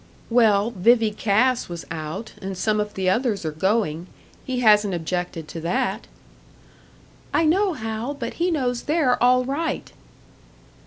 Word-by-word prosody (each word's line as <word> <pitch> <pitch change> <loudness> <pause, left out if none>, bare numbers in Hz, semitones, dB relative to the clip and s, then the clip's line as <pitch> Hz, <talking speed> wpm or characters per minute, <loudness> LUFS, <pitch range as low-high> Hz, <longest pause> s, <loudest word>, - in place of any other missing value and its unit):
"Well, 220 -2 +4
Vivie 225 +2 +3
Cass 220 +4 +1
was 170 -1 -7
out, 160 +7 -6
and 190 -1 -5
some 215 +2 +1
of 210 0 -3
the 190 -1 -1
others 210 -1 0
are 155 - -1
going. 180 0 0 0.4
He 255 -1 -3
hasn't 210 -4 +4
objected 170 -1 -4
to 165 - -6
that." 190 +5 -1 1.3
"I 325 - +3
know, 380 +4 +2
Hal. 225 +2 -4
But 240 -4 -5
he 355 - +3
knows 250 -7 -1
they're 290 -5 +1
all 250 +1 +4
right." 290 +5 -3
220 Hz, 145 wpm, -23 LUFS, 190-250 Hz, 1.3 s, Well